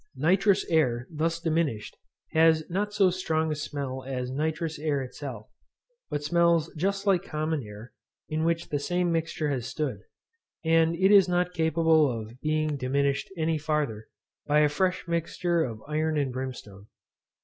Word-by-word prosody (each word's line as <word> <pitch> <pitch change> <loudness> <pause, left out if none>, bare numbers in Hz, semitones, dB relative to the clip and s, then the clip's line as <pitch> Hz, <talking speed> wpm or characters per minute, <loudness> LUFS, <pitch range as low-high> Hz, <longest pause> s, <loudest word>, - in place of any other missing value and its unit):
Nitrous 190 +4 +3
air 130 -7 +1
thus 165 +1 -1
diminished 160 -9 -1 0.4
has 160 -1 +4
not 205 +3 -1
so 200 -3 +3
strong 160 -3 -1
a - - -1
smell 140 -3 -4
as 125 -1 -4
nitrous 155 +3 -2
air 145 -3 0
itself, 125 -4 -8 0.6
but 145 0 -3
smells 170 0 +2
just 195 +5 -1
like 190 -3 +3
common 155 -4 -2
air 105 +1 -11 0.3
in 155 +1 -1
which 170 0 0
the 145 - -1
same 175 +3 0
mixture 160 -2 -1
has 125 -3 -2
stood; 140 +1 -3 0.7
and 165 0 +3
it 190 +3 +3
is 195 -3 +7
not 180 0 +1
capable 160 -2 +3
of 115 +1 -7
being 155 -1 0
diminished 140 +2 0
any 160 -1 0
farther, 145 -8 -2 0.4
by 150 +1 +4
a 150 - +4
fresh 185 +4 -1
mixture 170 +1 0
of 110 -5 -6
iron 155 +1 0
and 140 -3 0
brimstone. 120 -6 -7
155 Hz, 155 wpm, -27 LUFS, 140-170 Hz, 0.7 s, is